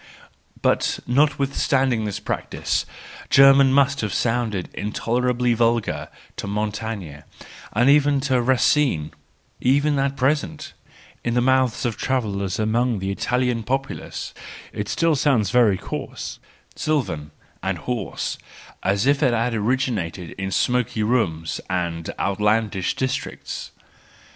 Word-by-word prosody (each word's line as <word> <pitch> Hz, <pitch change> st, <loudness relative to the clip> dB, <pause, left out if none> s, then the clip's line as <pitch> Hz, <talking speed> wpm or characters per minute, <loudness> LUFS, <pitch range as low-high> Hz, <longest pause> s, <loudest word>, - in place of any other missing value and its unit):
But -, -, +2 dB
notwithstanding 135 Hz, -3 st, +2 dB
this 105 Hz, -2 st, -3 dB
practice, -, -, -2 dB, 0.4 s
German 135 Hz, 0 st, +7 dB
must 140 Hz, +1 st, +3 dB
have 105 Hz, -3 st, -2 dB
sounded 115 Hz, -5 st, 0 dB
intolerably 120 Hz, +3 st, 0 dB
vulgar 115 Hz, -1 st, +1 dB, 0.3 s
to -, -, -4 dB
Montaigne, 105 Hz, -5 st, -3 dB, 0.5 s
and 120 Hz, +4 st, +2 dB
even 145 Hz, 0 st, +5 dB
to 130 Hz, -3 st, +2 dB
Racine: 130 Hz, -, +2 dB, 0.5 s
even 145 Hz, +3 st, +2 dB
at 135 Hz, 0 st, 0 dB
present, 150 Hz, +3 st, -1 dB, 0.5 s
in 120 Hz, 0 st, -1 dB
the -, -, +4 dB
mouths 130 Hz, -1 st, +2 dB
of 115 Hz, -3 st, -1 dB
travellers 100 Hz, -7 st, -1 dB
among 115 Hz, +2 st, +1 dB
the 95 Hz, 0 st, -2 dB
Italian 125 Hz, +3 st, 0 dB
populace, 135 Hz, +4 st, -4 dB, 0.4 s
it 105 Hz, 0 st, -4 dB
still 165 Hz, -2 st, +2 dB
sounds 130 Hz, -9 st, +2 dB
very 115 Hz, -6 st, +4 dB
coarse, -, -, -6 dB, 0.4 s
sylvan, 95 Hz, -, -1 dB, 0.3 s
and 95 Hz, -1 st, -1 dB
hoarse, 115 Hz, +3 st, -3 dB, 0.4 s
as 100 Hz, +3 st, +1 dB
if 140 Hz, +1 st, +3 dB
it 130 Hz, -5 st, +3 dB
had 115 Hz, +1 st, 0 dB
origi¬ 125 Hz, +4 st, +1 dB
nated 85 Hz, -3 st, -5 dB
in 95 Hz, 0 st, -2 dB
smoky 120 Hz, +1 st, +1 dB
rooms 90 Hz, -, 0 dB
and 85 Hz, -3 st, -2 dB
outlandish 105 Hz, 0 st, +1 dB
districts. 130 Hz, -1 st, -4 dB
120 Hz, 120 wpm, -23 LUFS, 105-135 Hz, 0.5 s, German